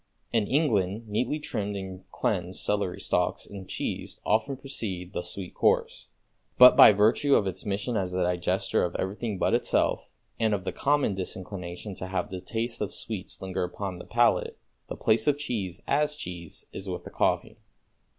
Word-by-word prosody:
In 110 -3 +2
England 110 - +1
neatly 115 +8 0
trimmed 105 -8 -3
and 95 -1 -7
cleansed 90 +1 -1
celery 100 -3 -1
stalks 90 0 0
and 95 -2 -10
cheese - - -4
often 110 +6 +1
precede 100 -9 -5
the - - -2
sweet 90 +1 -7
course; - - +1 0.5
but 125 0 +10
by - - +10
virtue 110 +8 +4
of 100 - +3
its 95 +3 -4
mission 100 +4 -1
as 95 -3 -1
a 90 0 0
digester 90 0 +1
of 90 - -2
everything 100 +2 -2
but - - +1
itself - - +1 0.3
and 110 -2 +3
of 95 - -5
the - - -1
common 145 -6 +1
disinclination 95 0 -6
to 95 - -6
have 95 +2 -2
the 95 -1 -5
taste 115 +4 -3
of 105 - -1
sweets 100 -4 -5
linger 95 -1 -2
upon 90 +1 -4
the - - -9
palate, - - +2 0.3
the - - -4
place 110 0 +2
of 145 -1 +4
cheese 100 -11 -3
as 150 +1 +1
cheese 85 - -8
is 95 0 -6
with 90 - -4
the - - -10
coffee. - - 0
100 Hz, 175 wpm, -27 LUFS, 90-115 Hz, 0.5 s, but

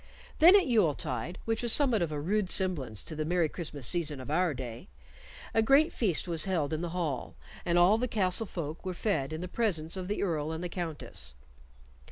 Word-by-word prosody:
Then 345 +5 +8
at 395 - +5
Yule 210 - +3
tide, 140 +4 -4
which 225 -1 -1
was 240 -1 +3
somewhat 255 -7 +4
of 165 -2 -1
a 150 - -3
rude 190 +5 0
semblance 150 - +1
to 160 - -6
the 155 - -2
Merry 170 +1 +1
Christmas 150 -5 -6
season 155 -5 -1
of 130 +2 -7
our 175 +2 +2
day, 125 -3 -7 0.7
a 225 - +3
great 275 +7 +4
feast 190 -7 0
was 165 -1 +2
held 160 -6 -1
in 155 - -2
the 175 - -3
hall, 165 -6 -3 0.3
and 175 0 +1
all 185 +6 +5
the 250 - 0
castle 205 -1 0
folk 160 -4 -6
were 185 -1 -4
fed 155 -10 -1
in 155 +1 -5
the 180 - -4
presence 175 -6 -1
of 185 -1 -5
the 205 +1 -2
Earl 160 -5 -1
and 160 +2 -5
the 175 - -3
Countess. 160 - -6
175 Hz, 215 wpm, -30 LUFS, 155-200 Hz, 0.7 s, Then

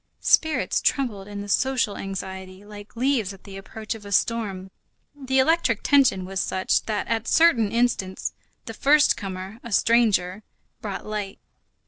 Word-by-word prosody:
Spirits 315 -1 +2
trembled 215 -8 -1
in 205 -1 -6
the 205 - -7
social 250 0 +1
anxiety 190 0 -7
like 205 +1 -12
leaves 235 -5 0
at 195 - -16
the 195 -2 -11
approach 215 +3 -6
of 220 -2 -11
a 200 - -10
storm. 195 -3 -1 0.4
The 265 -2 -2
electric 265 -4 +2
tension 260 -10 +3
was 190 0 -4
such 185 +1 0
that 215 -2 -2
at 230 0 -2
certain 250 -11 +4
instants, 230 -5 -1 0.3
the 225 - -7
first 290 +6 +4
comer, 190 +2 -7
a 235 - -10
stranger, 210 -4 +2 0.4
brought 200 -3 -5
light. 210 -2 -5
210 Hz, 150 wpm, -24 LUFS, 195-240 Hz, 0.4 s, certain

